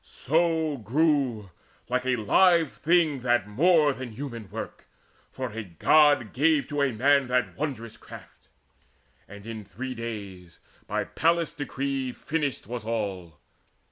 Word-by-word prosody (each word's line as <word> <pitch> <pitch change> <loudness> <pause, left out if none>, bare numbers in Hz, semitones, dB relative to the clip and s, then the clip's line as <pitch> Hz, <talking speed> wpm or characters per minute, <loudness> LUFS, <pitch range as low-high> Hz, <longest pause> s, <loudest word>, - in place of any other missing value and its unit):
So 160 0 0
grew 125 - 0 0.4
Like 125 +1 -1
a 130 - +2
live 165 - +3
thing 160 -3 +2
that 120 -4 +1
more 150 - +3
than 130 -3 -8
human 115 -5 -7
work, 110 +3 -7 0.5
For 130 -3 -5
a 115 +1 -5
God 130 - +3
gave 150 +1 +2
to 145 -1 -1
a 140 -2 +2
man 135 +4 +3
that 125 0 0
wondrous 125 -7 -5
craft. - - -14 0.8
And 100 +1 -12
in 110 -2 -7
three 125 +7 -6
days, 100 -7 -7 0.3
by - - -1
Pallas's 165 -1 0
decree, 135 -3 -3
Finished 145 -5 -3
was 120 +1 -6
all. 100 -8 -4
130 Hz, 135 wpm, -26 LUFS, 110-150 Hz, 0.8 s, live